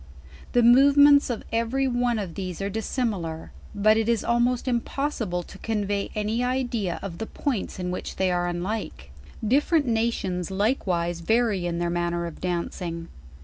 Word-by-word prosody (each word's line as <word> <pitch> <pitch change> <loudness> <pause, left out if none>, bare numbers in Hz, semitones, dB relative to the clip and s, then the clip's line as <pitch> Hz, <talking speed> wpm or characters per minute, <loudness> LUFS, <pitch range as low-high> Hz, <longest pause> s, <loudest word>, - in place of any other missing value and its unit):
The 245 - +4
movements 285 +4 +7
of 235 -3 -3
every 235 +4 +1
one 245 -1 +1
r>f 190 -6 -4
thes 185 -2 -5
e 195 - -2
are 200 - -2
dissimilar; 200 -7 -3 0.2
but 215 +2 +4
it 225 0 +1
is 230 -2 +1
almoct 240 +2 +1
impossible 235 -6 -1
to - - -13
convey 205 -2 -1
any 215 +3 0
idea 245 -7 -1
of 180 -4 -6
the 225 - -4
points 255 -9 -3
in 180 -1 -3
which 180 - -5
they 190 -1 +1
are 175 0 0
unlike. 175 - -4 0.4
Different 290 +5 +3
nations 225 -6 -1
likewise 190 -5 0
vary 210 -1 +1
in 170 -1 -2
their 170 0 -1
manner 175 0 -1
of 170 - -8
dancing. 170 -1 -3
210 Hz, 160 wpm, -25 LUFS, 175-240 Hz, 0.4 s, movements